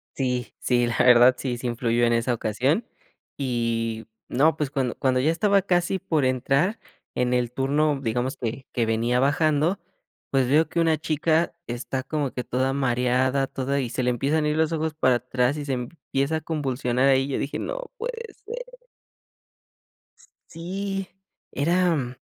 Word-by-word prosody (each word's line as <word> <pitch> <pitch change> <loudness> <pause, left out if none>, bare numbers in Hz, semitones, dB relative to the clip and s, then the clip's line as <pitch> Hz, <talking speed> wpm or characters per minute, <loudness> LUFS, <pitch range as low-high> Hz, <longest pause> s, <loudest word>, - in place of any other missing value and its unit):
Sí, 125 -3 -2
sí, 120 -1 +2
la 115 - -2
verdad 125 0 +7
sí, 125 -3 -3
sí 125 - -4
influyó 120 0 0
en 120 - +2
esa 115 +2 +1
ocasión. 130 - 0 0.5
Y 115 -4 -2 0.2
no, 155 +5 +3
pues, 150 -3 -1
cuando 130 -4 -1
cuando 130 -1 +1
ya 140 +5 +2
estaba 200 +3 +3
casi 180 0 +1
por 155 -5 0
entrar 135 - +1 0.4
en 125 0 +1
el 120 -1 0
turno, 140 +3 +1
digamos 125 +3 -1
que, 120 +2 -4
que 120 - +1
venía 115 +2 +1
bajando, 155 +5 +2 0.5
pues, 135 -2 +2
veo 155 +3 +4
que - - -1
una 165 -1 +3
chica 160 +2 +1
está 120 +2 -3
como 145 -1 -2
que 125 - -4
toda 130 +2 0
mareada, 130 0 +1
toda 135 +1 -2
y 125 -4 -2
se 130 - -2
le 125 - +2
empiezan 140 +6 +1
a 150 - +2
ir 150 - 0
los 160 0 +2
ojos 160 -1 -1
para 130 -5 +3
atrás 125 +2 0
y 145 - -5
se 140 - -1
empieza 140 +3 -2
a - - -6
convulsionar 135 -5 0
ahí. 135 0 +3
Yo 140 - -2
dije: 140 - -3
"No - - -5
puede 465 -2 -5
ser". - - -9 1.6
Sí, 195 +3 -4 0.4
era 155 -5 +1
135 Hz, 165 wpm, -25 LUFS, 125-160 Hz, 1.6 s, verdad